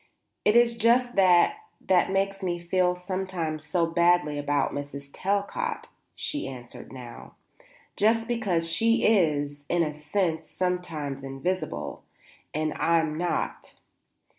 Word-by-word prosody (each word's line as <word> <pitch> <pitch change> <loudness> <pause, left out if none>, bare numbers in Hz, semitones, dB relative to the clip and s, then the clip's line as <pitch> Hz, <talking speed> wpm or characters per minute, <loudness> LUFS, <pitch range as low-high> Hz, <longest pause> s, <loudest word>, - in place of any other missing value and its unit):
"It 210 - +3
is 235 -1 +4
just 245 +2 +3
that 185 - +5 0.2
that 185 -1 +2
makes 195 +1 0
me 175 -2 -1
feel 180 +1 +1
sometimes 180 -4 -3
so 165 +3 +1
badly 165 -3 +2
about 145 -1 0
Mrs. 140 0 -6
Talcott," 205 - -2 0.3
she 295 - -3
answered 125 -2 -8
now; 125 -2 -10 0.6
"just 225 +2 +2
because 200 -9 0
she 230 +7 +2
is, 145 -8 +2
in 175 -1 +3
a 150 -2 -2
sense, 160 +3 -1
sometimes 165 -7 -3
invisible, 140 +8 -3 0.5
and 155 0 -1
I'm 160 -2 +2
not. 175 +2 -3
175 Hz, 120 wpm, -27 LUFS, 150-195 Hz, 0.6 s, that